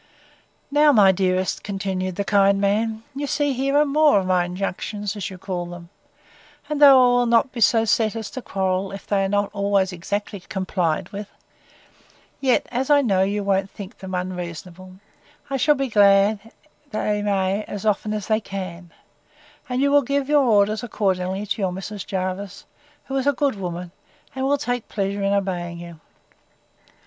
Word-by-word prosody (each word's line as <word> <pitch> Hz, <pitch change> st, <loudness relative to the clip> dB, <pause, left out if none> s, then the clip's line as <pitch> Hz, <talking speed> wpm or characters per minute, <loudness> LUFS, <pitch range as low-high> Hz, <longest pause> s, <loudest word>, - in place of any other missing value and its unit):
Now, 295 Hz, +1 st, +5 dB
my 205 Hz, -7 st, +6 dB
dearest, 185 Hz, 0 st, 0 dB
continued 190 Hz, -2 st, -3 dB
the 200 Hz, -, -1 dB
kind 200 Hz, -1 st, +3 dB
man, 220 Hz, +2 st, 0 dB
you 285 Hz, +1 st, -3 dB
see 290 Hz, 0 st, 0 dB
here 275 Hz, +2 st, 0 dB
are 300 Hz, -, +5 dB
more 300 Hz, -2 st, +4 dB
of 190 Hz, -, -3 dB
my 180 Hz, -1 st, +2 dB
injunctions, 195 Hz, +3 st, -4 dB
as 205 Hz, -, -4 dB
you 190 Hz, -, -9 dB
call 180 Hz, -2 st, -4 dB
them; 175 Hz, -1 st, -10 dB, 0.8 s
and 300 Hz, 0 st, -3 dB
though 280 Hz, -2 st, +9 dB
I 245 Hz, 0 st, +4 dB
will 245 Hz, -, +2 dB
not 235 Hz, +2 st, +3 dB
be 240 Hz, -, -6 dB
so 225 Hz, +1 st, +4 dB
set, 220 Hz, 0 st, +1 dB
as 220 Hz, -2 st, -5 dB
to 260 Hz, -, -6 dB
quarrel, 190 Hz, -2 st, -2 dB
if 195 Hz, -, -9 dB
they 200 Hz, -1 st, +1 dB
are 195 Hz, -, -1 dB
not 205 Hz, 0 st, 0 dB
always 200 Hz, -2 st, +1 dB
exactly 200 Hz, +3 st, -4 dB
complied 180 Hz, -3 st, -2 dB
with; 205 Hz, 0 st, -7 dB, 1.1 s
yet, 265 Hz, -3 st, +2 dB
as 255 Hz, +3 st, -2 dB
I 290 Hz, -1 st, +5 dB
know 195 Hz, -6 st, +2 dB
you 200 Hz, +2 st, 0 dB
won't 195 Hz, 0 st, 0 dB
think 200 Hz, +3 st, -10 dB
them 190 Hz, -1 st, -6 dB
unreasonable, 180 Hz, 0 st, -6 dB, 0.6 s
I 270 Hz, -, 0 dB
shall 295 Hz, +3 st, +3 dB
be 275 Hz, -1 st, -1 dB
glad 205 Hz, 0 st, +3 dB, 0.4 s
they 210 Hz, -1 st, -1 dB
may, 200 Hz, 0 st, 0 dB
as 205 Hz, +1 st, -7 dB
often 210 Hz, 0 st, 0 dB
as 210 Hz, -2 st, -3 dB
they 215 Hz, -1 st, +1 dB
can; 185 Hz, -4 st, -7 dB, 0.8 s
and 255 Hz, +2 st, 0 dB
you 280 Hz, -, +2 dB
will 285 Hz, 0 st, +5 dB
give 280 Hz, +1 st, -1 dB
your 295 Hz, 0 st, +4 dB
orders 210 Hz, -2 st, +3 dB
accordingly 190 Hz, -4 st, -1 dB
to 210 Hz, +1 st, -3 dB
your 190 Hz, -2 st, 0 dB
Mrs. 195 Hz, +2 st, -7 dB
Jervis, 185 Hz, +1 st, -4 dB, 0.4 s
who 270 Hz, -, -5 dB
is 270 Hz, +1 st, -1 dB
a 285 Hz, -, +4 dB
good 280 Hz, +1 st, 0 dB
woman, 180 Hz, -3 st, -6 dB, 0.4 s
and 265 Hz, 0 st, -2 dB
will 285 Hz, +1 st, +2 dB
take 245 Hz, -3 st, -3 dB
pleasure 200 Hz, 0 st, -2 dB
in 195 Hz, 0 st, +1 dB
obeying 180 Hz, -4 st, -2 dB
you. 170 Hz, -2 st, -10 dB
200 Hz, 180 wpm, -22 LUFS, 190-235 Hz, 1.1 s, though